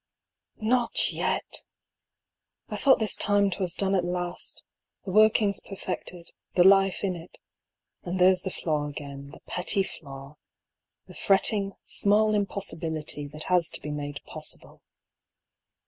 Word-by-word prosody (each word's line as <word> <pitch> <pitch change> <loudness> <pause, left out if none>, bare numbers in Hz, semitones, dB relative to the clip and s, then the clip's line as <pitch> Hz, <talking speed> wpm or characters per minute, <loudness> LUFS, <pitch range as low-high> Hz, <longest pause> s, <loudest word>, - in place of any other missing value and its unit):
OT 240 +1 +3
yet! - - +1 1.0
I - - -4
thought 270 -2 +4
this 220 -2 -1
time 205 -1 +2
'twas 180 -1 -1
done 195 0 0
at 185 -2 +2
last, 175 0 -3 0.4
the 190 - -4
workings 215 0 +4
perfected, 180 -3 -7 0.2
the 175 - +6
life 195 +1 +5
in 190 -2 0
it; 170 +1 -11 0.6
and 180 +1 -4
there's 185 0 +5
the 190 - -3
flaw 150 -5 -2
again, 140 -1 -8
the 145 - -14
petty 185 +2 0
flaw, 140 -4 -9 0.7
the - - -14
fretting 200 0 +3
small 215 +1 +2
impossibility 165 -7 -3
that 150 +2 -5
has 180 -3 +2
to - - -4
be 150 - -6
made 145 0 -5
possible. - - -8
185 Hz, 130 wpm, -27 LUFS, 155-200 Hz, 1.0 s, the